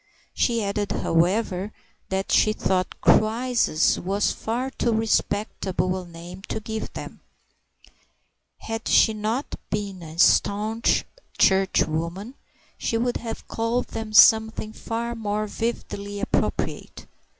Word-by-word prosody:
She 235 Hz, -3 st, +1 dB
added, 200 Hz, 0 st, -2 dB
however, 185 Hz, +3 st, 0 dB, 0.4 s
that 190 Hz, +1 st, -2 dB
she 215 Hz, -, +4 dB
thought 185 Hz, -4 st, -1 dB
"crisis" 230 Hz, -6 st, +3 dB
was 200 Hz, +3 st, 0 dB
far 245 Hz, +4 st, -3 dB
too 240 Hz, -, 0 dB
respectable 205 Hz, -4 st, 0 dB
a 185 Hz, -1 st, -6 dB
name 170 Hz, +2 st, -10 dB
to -, -, -3 dB
give 220 Hz, 0 st, -5 dB
them; -, -, -8 dB, 1.4 s
had 225 Hz, 0 st, -5 dB
she 220 Hz, -, +5 dB
not 220 Hz, +6 st, -3 dB, 0.2 s
been 200 Hz, -3 st, -3 dB
a 160 Hz, -1 st, -10 dB
staunch 215 Hz, +5 st, +3 dB, 0.3 s
Churchwoman, 190 Hz, +2 st, +1 dB, 0.5 s
she 230 Hz, -, 0 dB
would 240 Hz, +1 st, 0 dB
have 230 Hz, -1 st, -7 dB
called 230 Hz, +2 st, -1 dB
them 220 Hz, -1 st, -5 dB
something 220 Hz, 0 st, +5 dB
far 235 Hz, +1 st, -4 dB
more 215 Hz, -2 st, -2 dB
vividly 205 Hz, -2 st, -4 dB
appropriate. -, -, -2 dB
215 Hz, 115 wpm, -24 LUFS, 190-225 Hz, 1.4 s, she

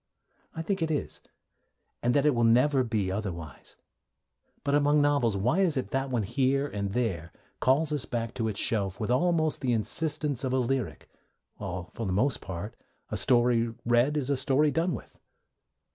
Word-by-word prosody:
I 160 Hz, -, -3 dB
think 195 Hz, +1 st, -2 dB
it 160 Hz, -, 0 dB
is, 150 Hz, -2 st, -3 dB, 0.8 s
and 120 Hz, +2 st, +1 dB
that 145 Hz, 0 st, +3 dB
it 150 Hz, -, +4 dB
will 120 Hz, -1 st, +1 dB
never 130 Hz, +4 st, +4 dB
be 110 Hz, -6 st, -1 dB
otherwise. 85 Hz, -8 st, -6 dB, 0.9 s
But, 140 Hz, -, 0 dB
among 145 Hz, +1 st, +4 dB
novels, 140 Hz, -8 st, +2 dB
why 120 Hz, -, +1 dB
is 175 Hz, -7 st, +2 dB
it 130 Hz, -, -3 dB
that 135 Hz, 0 st, -1 dB
one 120 Hz, -4 st, 0 dB
here 130 Hz, +6 st, +1 dB
and 100 Hz, -5 st, -4 dB
there 90 Hz, -9 st, -2 dB, 0.3 s
calls 145 Hz, +4 st, +2 dB
us 145 Hz, -4 st, -1 dB
back 115 Hz, -2 st, -3 dB
to 115 Hz, -3 st, -2 dB
its 105 Hz, -2 st, -2 dB
shelf 100 Hz, -4 st, 0 dB
with 110 Hz, +1 st, -1 dB
almost 160 Hz, +3 st, +1 dB
the 125 Hz, -2 st, +1 dB
insistence 145 Hz, +3 st, -1 dB
of 130 Hz, -1 st, -1 dB
a -, -, +2 dB
lyric, 130 Hz, -2 st, -2 dB, 0.5 s
while 90 Hz, -2 st, -6 dB
for 115 Hz, -, -4 dB
the 95 Hz, -, -1 dB
most 125 Hz, +6 st, +1 dB
part 95 Hz, +4 st, -6 dB, 0.4 s
a -, -, -1 dB
story 120 Hz, -2 st, +2 dB
read 120 Hz, +5 st, +3 dB
is 140 Hz, -1 st, -1 dB
a 140 Hz, -, +1 dB
story 140 Hz, +3 st, +2 dB
done 165 Hz, +3 st, 0 dB
with? -, -, -12 dB
125 Hz, 180 wpm, -28 LUFS, 110-145 Hz, 0.9 s, it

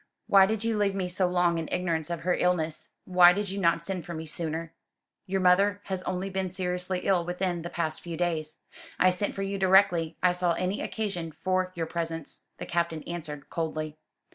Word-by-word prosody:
"Why 195 Hz, -1 st, +6 dB
did 220 Hz, 0 st, -2 dB
you 225 Hz, -2 st, 0 dB
leave 200 Hz, -1 st, +1 dB
me 190 Hz, -2 st, -1 dB
so 180 Hz, +1 st, +1 dB
long 175 Hz, -1 st, +2 dB
in 160 Hz, -, -5 dB
ignorance 165 Hz, -3 st, -1 dB
of 170 Hz, -1 st, -3 dB
her 180 Hz, +1 st, +1 dB
illness? 165 Hz, -4 st, 0 dB, 0.2 s
Why 180 Hz, -1 st, +7 dB
did 205 Hz, +1 st, -2 dB
you 200 Hz, -, -3 dB
not 170 Hz, -2 st, +2 dB
send 185 Hz, -1 st, -3 dB
for 170 Hz, +2 st, -7 dB
me 160 Hz, 0 st, -5 dB
sooner?" 160 Hz, +1 st, -3 dB, 0.5 s
"Your 190 Hz, 0 st, 0 dB
mother 195 Hz, +3 st, +4 dB
has 190 Hz, -1 st, -3 dB
only 185 Hz, +1 st, -3 dB
been 190 Hz, -1 st, -2 dB
seriously 180 Hz, 0 st, -2 dB
ill 190 Hz, -3 st, +2 dB
within 180 Hz, 0 st, -2 dB
the 170 Hz, -, -5 dB
past 160 Hz, -3 st, -2 dB
few 170 Hz, -2 st, -6 dB
days. 160 Hz, -3 st, -2 dB, 0.4 s
I 185 Hz, -, +5 dB
sent 180 Hz, +3 st, -2 dB
for 195 Hz, -, -2 dB
you 195 Hz, 0 st, -3 dB
directly 185 Hz, -4 st, +4 dB
I 180 Hz, -, +6 dB
saw 180 Hz, -1 st, +1 dB
any 185 Hz, +4 st, -2 dB
occasion 185 Hz, -7 st, -3 dB
for 185 Hz, +3 st, -1 dB
your 165 Hz, -1 st, -2 dB
presence," 165 Hz, -2 st, -2 dB
the -, -, -6 dB
Captain 170 Hz, -2 st, -1 dB
answered 155 Hz, -4 st, -7 dB
coldly. 155 Hz, -2 st, -3 dB
180 Hz, 200 wpm, -28 LUFS, 165-190 Hz, 0.5 s, Why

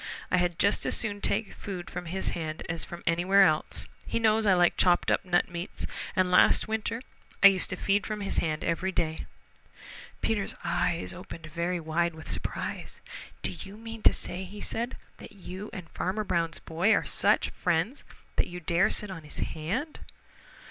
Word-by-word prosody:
I -, -, +4 dB
had 175 Hz, -2 st, +1 dB
just 200 Hz, -, +3 dB
as -, -, +2 dB
soon 205 Hz, -3 st, -2 dB
take 225 Hz, -, 0 dB
food 185 Hz, -3 st, -6 dB
from 175 Hz, -1 st, -6 dB
his 190 Hz, +3 st, -1 dB
hand 160 Hz, -2 st, -4 dB
as 165 Hz, 0 st, -1 dB
from 175 Hz, -, -8 dB
anywhere 180 Hz, +4 st, +5 dB
else. 155 Hz, -4 st, 0 dB, 0.2 s
He -, -, -1 dB
knows 220 Hz, -1 st, +3 dB
I 190 Hz, -, +6 dB
like 175 Hz, -1 st, +4 dB
chopped 175 Hz, -1 st, +4 dB
up -, -, +2 dB
nut 175 Hz, -1 st, +2 dB
meats, 175 Hz, 0 st, -5 dB, 0.3 s
and 185 Hz, -1 st, +2 dB
last 180 Hz, -, +6 dB
winter 220 Hz, +2 st, -2 dB, 0.4 s
I -, -, +13 dB
used 190 Hz, -2 st, -1 dB
to -, -, -2 dB
feed 200 Hz, +1 st, +1 dB
from 215 Hz, -1 st, -3 dB
his 195 Hz, -, 0 dB
hand 155 Hz, -2 st, -1 dB
every 170 Hz, +3 st, 0 dB
day." 160 Hz, -3 st, -1 dB, 1.0 s
Peter's 210 Hz, -3 st, 0 dB
eyes 170 Hz, 0 st, 0 dB
opened 175 Hz, -2 st, -9 dB
very 170 Hz, +3 st, -2 dB
wide 165 Hz, +1 st, 0 dB
with 160 Hz, -, -10 dB
surprise. -, -, -4 dB, 0.4 s
"Do -, -, 0 dB
you 195 Hz, +4 st, -8 dB
mean 225 Hz, 0 st, -8 dB
to -, -, +7 dB
say," 180 Hz, +2 st, -3 dB, 0.2 s
said 235 Hz, +4 st, -2 dB
he, -, -, -23 dB
"that -, -, -11 dB
you 190 Hz, +1 st, -7 dB
and 180 Hz, -3 st, -7 dB
Farmer 200 Hz, +4 st, -1 dB
Brown's 165 Hz, -4 st, 0 dB
boy 170 Hz, +7 st, +1 dB
are -, -, 0 dB
such -, -, +2 dB
friends 175 Hz, -, 0 dB, 0.3 s
that -, -, +3 dB
you 175 Hz, 0 st, -7 dB
dare 175 Hz, +2 st, +3 dB
sit 210 Hz, -2 st, -2 dB
on 175 Hz, -3 st, -6 dB
his 150 Hz, -, -9 dB
hand?" 195 Hz, -, -3 dB
180 Hz, 185 wpm, -29 LUFS, 170-205 Hz, 1.0 s, I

